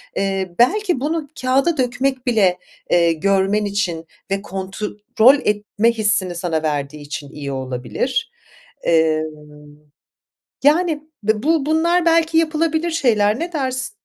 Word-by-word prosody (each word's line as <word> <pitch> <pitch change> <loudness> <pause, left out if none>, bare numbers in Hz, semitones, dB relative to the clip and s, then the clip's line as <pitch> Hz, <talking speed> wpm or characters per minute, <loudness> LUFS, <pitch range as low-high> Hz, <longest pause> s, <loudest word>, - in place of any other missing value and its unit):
Eee, 195 -2 -1
belki 360 - +2
bunu 310 +2 -2
kağıda 270 +6 +2
dökmek 255 +1 -1
bile, 200 -7 +3 0.3
eee, 170 -1 +4
görmen 195 +4 +1
için 180 -5 -2 0.3
ve 195 - 0
kontrol 210 +6 +1
etme 210 +2 +1
hissini 210 -5 0
sana 170 -2 -2
verdiği 150 -1 -3
için 145 -1 -7
iyi 140 -1 -6
olabilir. 130 - -3 0.5
Eee, 160 -1 +3 1.4
yani, 310 0 +3 0.2
be 215 +1 0
bu 315 -2 +1
bunlar 340 +2 +2
belki 330 -1 +3
yapılabilir 325 +1 0
şeyler. 225 -7 +2
Ne 345 +1 -4
dersin? 260 -4 -2
220 Hz, 120 wpm, -20 LUFS, 185-305 Hz, 1.4 s, eee